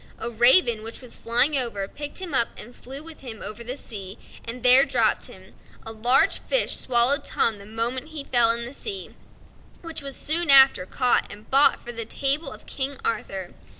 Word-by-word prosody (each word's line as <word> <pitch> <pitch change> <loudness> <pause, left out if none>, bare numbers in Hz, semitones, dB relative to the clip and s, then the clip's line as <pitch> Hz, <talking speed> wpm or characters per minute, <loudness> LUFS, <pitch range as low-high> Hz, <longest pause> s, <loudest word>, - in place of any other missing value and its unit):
A 235 - -6
raven, 240 0 +5
which 225 +1 -8
was 250 -3 -12
flying 245 +6 +3
over, 230 -7 -1
picked 290 +6 -8
him 365 -5 -7
up 235 -3 +4
and 240 +3 -11
flew 270 +4 -9
with 325 -1 -10
him 235 -5 -9
over 225 +2 -8
the 250 +4 -6
sea, 200 -6 -9 0.3
and 235 +1 -7
there 255 +2 +7
dropped 240 -5 +1
him. 190 +1 -16 0.3
A 225 - -7
large 240 +4 +1
fish - - 0
swallowed 250 +3 +2
Tom 220 -3 0
the 200 - -12
moment 235 +5 -3
he 310 -3 -7
fell 240 -4 +3
into 235 0 -1
the 245 - -9
sea, 390 +6 -5 0.7
which 330 -2 -5
was 275 -1 -5
soon 330 +2 -1
after 265 -9 +7
caught 250 +3 0
and 210 +2 -12
bought 275 +2 +4
for 240 - -8
the 230 -1 -4
table 280 +7 0
of - - -12
King 275 0 -5
Arthur. 190 -5 -4
245 Hz, 195 wpm, -23 LUFS, 230-280 Hz, 0.7 s, there